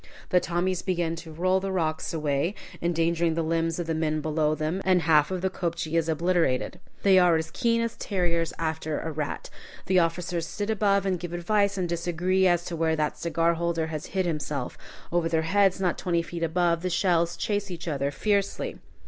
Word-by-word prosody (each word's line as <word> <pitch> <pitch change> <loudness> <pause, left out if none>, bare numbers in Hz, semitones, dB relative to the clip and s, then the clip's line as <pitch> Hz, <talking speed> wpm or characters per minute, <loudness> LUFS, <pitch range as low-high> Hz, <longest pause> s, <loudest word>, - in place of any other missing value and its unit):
The 180 - +5
Tommies 175 +1 -1
begin 175 -3 -1
to 165 -1 -9
roll 185 +4 +1
the 195 0 -3
rocks 160 -4 -1
away, 155 +3 0 0.3
endangering 170 -1 +1
the 165 - 0
limbs 165 0 0
of 175 - -2
the 165 - -1
men 155 -1 0
below 155 0 +1
them, 155 +5 -2
and 185 -2 +3
half 150 -2 +4
the 190 0 -1
kopje 170 -3 -3
is 165 -1 +1
obliterated. 165 -5 +1 0.2
They 190 -2 +6
are 175 -2 +5
as 160 0 -2
keen 230 -2 +1
as 230 -1 -2
terriers 170 -4 0
after 160 -1 -2
a 160 - -4
rat. 150 -1 -4 0.3
The 185 -1 +4
officers 170 0 -1
sit 205 +5 -3
above 200 -2 +2
and 185 -2 0
give 175 0 -6
advice 200 +3 +1
and 180 -2 0
disagree 175 +2 +1
as 175 -1 +2
to 175 - -4
where 160 0 +1
that 155 -1 -1
cigar 170 0 +1
holder 170 -1 -1
hid 160 +4 -3
itself. 150 -5 -3 0.4
Over 170 -1 +1
their 160 -1 +1
heads, 195 +2 +3
not 180 -2 0
twenty 170 -2 0
feet 170 0 -6
above, 170 0 +1
the 185 - -1
shells 170 -2 +1
chase 205 -1 -1
each 175 -1 -7
other 140 -3 0
fiercely. 200 +7 -1
170 Hz, 190 wpm, -26 LUFS, 160-185 Hz, 0.4 s, They